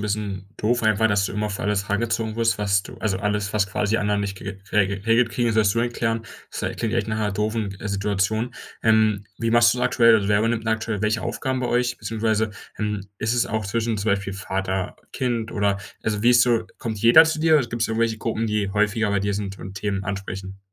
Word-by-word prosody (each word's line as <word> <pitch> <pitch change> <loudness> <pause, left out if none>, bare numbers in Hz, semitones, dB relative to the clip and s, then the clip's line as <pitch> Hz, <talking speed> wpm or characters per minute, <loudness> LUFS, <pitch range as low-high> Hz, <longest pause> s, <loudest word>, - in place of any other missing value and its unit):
'n - - -5
bisschen 100 -2 -3
doof 120 +3 +1
einfach, 110 0 +3
dass 100 -1 +2
du - - -6
immer 105 0 -1
für 100 - -4
alles 100 -1 0
herangezogen 110 +1 -1
wirst, 115 -2 +1
was 100 -1 +2
du - - -11
also 100 -4 -1
alles, 105 0 -1
was 105 -2 +2
quasi 105 +3 0
anderen 105 -1 0
nicht 100 -1 -3
ge 100 +1 -7
rege 100 -1 +3
regelt 115 +2 +3
kriegen, 120 - 0
das 110 - 0
wirst 105 -2 +3
du - - 0
dann 120 +1 +1
klären. 115 -1 -1 0.3
Das - - -5 0.2
klingt 115 -1 -2
echt 110 -2 0
nach 110 - -1
'ner 105 -2 -1
doofen, 105 -1 -2
äh, 105 - -4
Situation. 105 +4 -1 0.3
Ähm, 110 -2 +3
wie 115 0 0
machst 115 0 +6
du's 125 - -3
aktuell, 115 -2 +5
also 100 -2 -1
wer 105 -1 +4
übernimmt 115 0 0
denn 110 - +1
aktuell 110 -2 -2
welche 110 +1 +1
Aufgaben 130 -2 -2
bei 125 - -1
euch? 125 0 +1
Beziehungsweise, 110 -1 0 0.3
ähm, 105 -1 -2 0.2
ist 110 +1 0
es 120 - +2
auch 110 -1 -2
zwischen 115 +3 -1
zum 105 +1 -1
Beispiel 100 0 -1
Vater, 95 -1 -3 0.2
Kind 120 -3 -2
oder 100 -1 +1 0.2
also, 105 -1 -1
wie 120 - +5
ist 120 -1 +6
so 120 -2 +2
kommt 110 -2 -4
jeder 120 +9 +8
zu 160 -1 -1
dir 160 0 +4
oder 135 - -1
gibt's 120 -1 -1
da 110 - -3
irgendwelche 115 0 0
Gruppen, 115 0 -2
die 105 -2 -1
häufiger 105 +1 +1
bei 100 -1 +1
dir 100 +1 -1
sind 100 -1 -4
und 95 +1 -8
Themen 100 0 -2
ansprechen? 95 -1 -5
110 Hz, 235 wpm, -23 LUFS, 100-115 Hz, 0.3 s, jeder